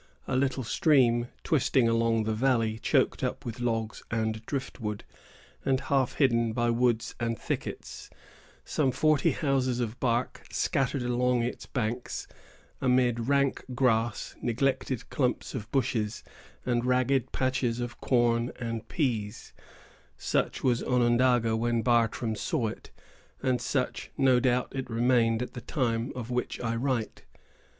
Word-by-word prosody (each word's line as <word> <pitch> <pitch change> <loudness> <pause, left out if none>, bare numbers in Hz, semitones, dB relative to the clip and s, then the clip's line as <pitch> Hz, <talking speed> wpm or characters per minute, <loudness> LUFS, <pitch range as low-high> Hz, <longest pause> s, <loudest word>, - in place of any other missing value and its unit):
A 130 - -1
little 130 0 +1
stream, 120 -2 +3 0.2
twisting 130 -4 +2
along 115 -1 +2
the 110 0 -1
valley, 115 -2 +1
choked - - +1
up - - -2
with 120 0 -5
logs 115 -2 -2
and 110 0 -1
driftwood, 115 -6 -4 0.6
and 135 -1 +2
half 135 -2 +1
hidden 115 -5 +2
by 120 0 +1
woods 120 -1 +1
and 115 -1 -1
thickets, 65 +1 -5 0.6
some 140 -4 +1
forty 155 +1 +3
houses 130 -4 0
of 120 -1 -3
bark, 120 0 0
scattered 135 -1 0
along 125 0 +1
its 120 - -4
banks, 120 -1 -3 0.6
amid 125 -2 +2
rank 140 -1 +2
grass, 120 -3 +1
neglected 130 0 -1
clumps 125 -3 -1
of 110 -5 -5
bushes, 115 -5 -1 0.4
and 120 -1 +1
ragged 130 0 +1
patches 130 -2 0
of 120 0 -5
corn 120 -1 +2
and 115 -2 -4
peas,——such 110 -9 -3
was 125 -2 +2
Onondaga 120 -2 +3
when 115 0 0
Bartram 115 -1 +2
saw 115 - -1
it, - - -10 0.5
and 130 -2 +1
such, 125 +1 -2
no 130 -2 +4
doubt, 125 -1 +1
it 130 -2 -4
remained 115 0 +2
at - - -7
the 125 - -7
time 120 -2 -1
of 125 -1 -5
which 125 0 -2
I 115 -1 -1
write. 120 -2 -2
120 Hz, 135 wpm, -28 LUFS, 115-130 Hz, 0.6 s, no